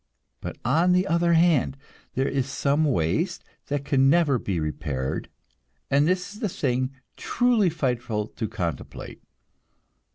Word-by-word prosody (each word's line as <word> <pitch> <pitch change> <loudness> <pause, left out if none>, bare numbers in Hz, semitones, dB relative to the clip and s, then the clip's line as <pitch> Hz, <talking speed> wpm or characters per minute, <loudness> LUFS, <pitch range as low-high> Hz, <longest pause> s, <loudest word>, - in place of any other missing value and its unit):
But, - - -6
on 175 +3 +3
the 180 +1 +3
other 170 -1 +2
hand, 160 -5 +3 0.4
there 135 +1 +1
is 135 -2 -1
some 140 +3 +1
waste 140 - 0 0.2
that 145 -1 -2
can 135 -1 +4
never 145 -5 +3
be 95 -6 -2
repaired, 70 -4 -3 0.6
and 140 +2 +4
this 185 +2 0
is 210 - -12
the 215 -4 -1
thing 130 -5 0 0.3
truly 240 -6 +2
frightful 120 -8 -1
to 110 - -4
contemplate. 85 -4 -5
140 Hz, 135 wpm, -25 LUFS, 125-175 Hz, 0.6 s, can